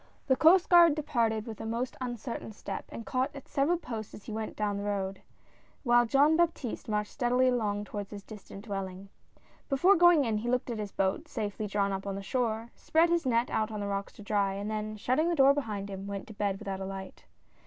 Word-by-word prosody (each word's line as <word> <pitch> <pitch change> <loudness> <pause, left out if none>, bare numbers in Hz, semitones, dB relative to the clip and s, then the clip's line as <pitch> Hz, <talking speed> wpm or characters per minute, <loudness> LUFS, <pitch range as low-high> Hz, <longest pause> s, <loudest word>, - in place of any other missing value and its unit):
rjHHE 260 - +4
Coast 350 +3 +6
Guard 340 -4 +7
departed 230 -8 0
with 220 -2 -7
a - - -5
most 235 +3 -2
uncertain 240 -1 -4
X 215 - -11
step - - -5
and 230 - -8
caught 260 +2 -1
at 275 - -10
several 290 +6 +1
posts 225 -10 -6
as 205 - -12
he - - -8
went 220 0 -4
down 205 -1 -1
the 200 - -4
road, 195 -2 -2 0.6
while 240 -2 +4
Jean 285 +5 +4
Baptiste 320 -10 -1
marched 210 -1 -1
steadily 250 0 +2
along 210 -4 0
toward 205 -1 -6
his 200 -1 -8
distant 205 -1 -11
dwelling. 195 -2 -5 0.6
Before 350 +9 +5
going 345 -4 +6
in 220 -2 0
he 235 +3 -3
looked 250 0 0
at 225 - -4
his 205 -2 -4
boat, 190 0 -1
safely 210 0 -3
drawn 200 0 0
up 195 +1 -4
on 195 - -2
the 195 - -5
shore, 230 0 -1
spread 330 +2 +2
his 340 -5 +1
net 235 0 +1
out 215 0 0
on 215 -1 -5
the 205 - -3
rocks 200 0 -3
to 210 - -12
dry, 200 -2 +1
and 205 +2 -4
then 215 0 -3
shutting 260 +10 +1
the 345 - +1
door 275 -1 +6
behind 215 -8 -3
him, 195 0 -7
went 200 -1 -5
to - - -8
bed 200 -2 -1
without 195 -1 -5
a 190 - -4
light. 190 0 -8
220 Hz, 230 wpm, -30 LUFS, 200-260 Hz, 0.6 s, Guard